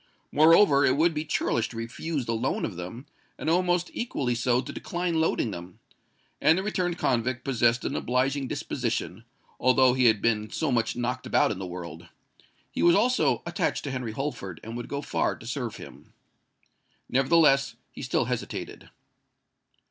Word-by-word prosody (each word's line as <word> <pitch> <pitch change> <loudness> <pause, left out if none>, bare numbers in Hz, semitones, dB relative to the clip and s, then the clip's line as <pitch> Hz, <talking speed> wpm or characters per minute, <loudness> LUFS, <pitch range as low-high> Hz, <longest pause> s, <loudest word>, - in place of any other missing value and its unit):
Moreover, 155 -1 +6
it 130 0 +3
would 165 +2 +3
be 155 0 -3
churlish 115 -6 0
to 115 - -9
refuse 125 +5 -4
the 115 - -1
loan 110 - -1
of 100 - -5
them—and 105 - -8
almost 175 0 +1
equally 140 - -2
so 120 +1 +1
to - - -5
decline 175 -2 -2
loading 125 -7 0
them;—and 95 - -3
the 190 - -1
returned 180 -4 -1
convict 125 -1 0
possessed 120 -2 +2
an - - -2
obliging 130 +2 0
disposition, - - -3 0.3
although 130 0 +4
he 130 0 +2
had 110 -3 +5
been 110 -1 0
so 160 -4 -1
much 115 -2 0
knocked 125 +1 -3
about - - +3
in 100 - -4
the 95 - -5
world. 85 -1 -8 0.6
He - - -3
was 170 0 +6
also 200 - +2
attached 170 - -1
to 140 - -4
Henry 125 -4 -4
Holford, 110 - -5
and 115 +1 -7
would 120 0 -5
go 140 +1 -4
far - - 0
to - - -14
serve 125 -1 -4
him. - - -13 0.9
Nevertheless, 135 +1 +3 0.2
he - - -10
still - - 0
hesitated. - - -5
130 Hz, 165 wpm, -27 LUFS, 115-155 Hz, 0.9 s, Moreover